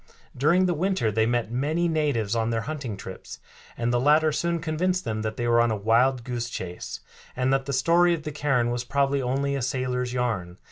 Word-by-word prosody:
During 170 +8 +3
the 180 - +1
winter 175 - 0
they 110 +2 +2
met 120 -1 0
many 155 +8 0
natives 145 -10 0
on 115 0 0
their 115 -1 0
hunting 135 -6 -5
trips, 95 -1 -9 0.4
and 120 +1 0
the 120 - +2
latter 155 +4 +4
soon 170 +3 0
convinced 180 +4 -1
them 110 -1 -2
that 110 0 -4
they 120 - -1
were 120 0 +4
on 120 - +2
a 110 - 0
wild 115 +5 +2
goose 120 -1 -4
chase, 90 -5 -6 0.3
and 130 +1 +1
that 135 0 0
the - - -2
story 170 +6 +3
of 155 - -9
the 150 - -4
cairn 135 -5 +1
was 120 0 -2
probably 140 +1 +1
only 135 +2 -1
a 135 - -2
sailor's 125 -1 -1
yarn. 110 -8 -2
130 Hz, 215 wpm, -25 LUFS, 115-150 Hz, 0.4 s, latter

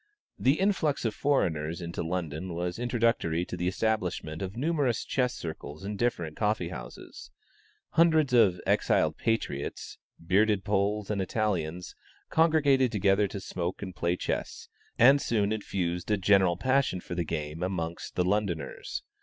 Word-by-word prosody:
The 135 +4 +3
influx 180 -9 +1
of 110 - 0
foreigners 85 - 0
into 85 -1 -5
London 85 0 -3
was 90 +3 -3
introductory 115 -9 +1
to - - -6
the 90 0 -2
establishment 90 -6 -1
of 95 +2 -5
numerous 140 -4 0
chess 125 -2 0
circles 80 +1 -7
in 105 +1 -3
different 85 -8 -1
coffee 105 -5 0
houses. 60 -6 -9 0.6
Hundreds 160 -5 +4
of 95 -7 +5
"exiled - - +2
patriots," 115 -11 -3 0.2
bearded 100 +4 +2
Poles 105 0 0
and 100 -2 0
Italians, 90 -4 -2 0.4
congregated 145 -6 +4
together 100 -1 +3
to 100 - -6
smoke 90 -1 -4
and 95 -2 -7
play 85 0 0
chess, - - -4 0.3
and 135 +4 +6
soon 105 -3 +1
infused 90 -4 -3
a 105 - +3
general 95 -2 +4
passion 130 -4 +1
for 90 - -7
the 85 0 -1
game 75 0 -4
amongst 85 -2 -3
the 90 - +1
Londoners. 100 -3 -2
95 Hz, 145 wpm, -28 LUFS, 85-115 Hz, 0.6 s, and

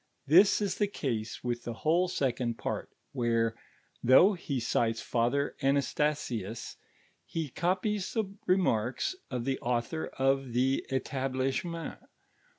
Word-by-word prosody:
This 180 +8 +6
Ih - - +2
the 205 -8 -1
ease 110 -3 -3
with 120 -1 -2
the 120 - -5
whole 175 +4 +4
second 125 -7 -1
])art, - - -3 0.2
where, 115 -3 +1 0.5
though 150 - +7
he 145 -7 -3
cites 115 -1 +1
Father 125 +4 0
Anastnsius, 135 -6 -1 0.5
he 160 -3 -4
copies 185 - -1
the 220 -2 +1 0.2
renuirks 130 - +2 0.2
of 125 -2 -3
the 135 -1 -1
author 120 +6 -1
of 135 -1 +1
the 130 +2 +2
Ktithlmnncnt. 135 +5 -2
135 Hz, 120 wpm, -30 LUFS, 120-165 Hz, 0.5 s, though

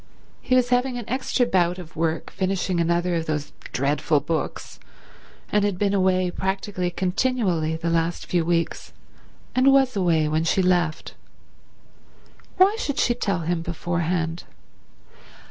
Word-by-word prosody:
He 255 - +1
was 250 -1 +3
having 250 0 +1
an 240 - -6
extra 255 0 0
bout 180 -5 +1
of 170 -3 -10
work 160 0 -2
finishing 185 -1 -1
another 170 +1 +1
of 165 -1 -1
those 150 -1 -2 0.2
dreadful 145 +3 +1
books, 165 +2 -4 0.7
and 210 -1 +3
had 205 -3 0
been 200 +1 +1
away 185 -2 +2
practically 190 -1 -2
continually 180 -3 0
the 165 +1 -2
last 165 +1 0
few 175 -2 0
weeks, 170 0 -1 0.6
and 260 +2 +4
was 270 -3 +3
away 170 -5 +2
when 155 +1 0
she 185 +3 +2
left. 175 -3 0 1.4
Why 380 +3 +5
should 285 - -2
she 240 - +3
tell 200 -7 -1
him 165 +1 -1
beforehand? 170 0 -2
180 Hz, 140 wpm, -24 LUFS, 165-205 Hz, 1.4 s, Why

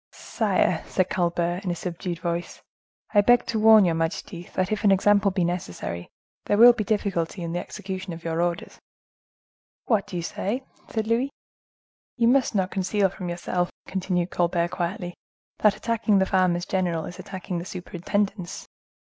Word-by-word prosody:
"Sire," 185 -5 0
said 185 -1 0
Colbert 175 -1 0
in 185 - -2
a 175 - 0
subdued 175 0 -4
voice, 170 0 -4 0.5
"I 205 - +6
beg 245 +3 +4
to 220 - -1
warn 220 -2 +7
your 170 - +2
majesty, 165 +2 -3
that 185 +1 0
if 215 0 -1
an 205 - +5
example 200 +1 +4
be 185 -2 0
necessary, 90 - -4 0.4
there 205 - +2
will 240 +2 +9
be 220 - -2
difficulty 195 -5 -1
in 165 - -3
the 175 - -1
execution 190 0 -6
of 165 0 -8
your 165 0 -1
orders." 175 -1 -2 1.1
"What 215 -5 +1
do - - -8
you 170 - -2
say?" 225 +9 -3 0.3
said 220 -1 -2
Louis. 235 +4 +1 0.9
"You 235 -1 +4
must 260 -3 +3
not 190 -2 +1
conceal 195 +1 +1
from 180 -1 -6
yourself," 175 +1 -1 0.2
continued 180 -2 -1
Colbert 175 0 +1
quietly, 175 0 -3 0.5
"that 210 -1 +4
attacking 230 -3 +1
the 190 - +3
farmers 185 -2 +2
general 175 -4 -1
is 180 - -9
attacking 185 -3 -5
the 170 - -6
superintendence. 185 +1 -3
185 Hz, 165 wpm, -25 LUFS, 175-205 Hz, 1.1 s, will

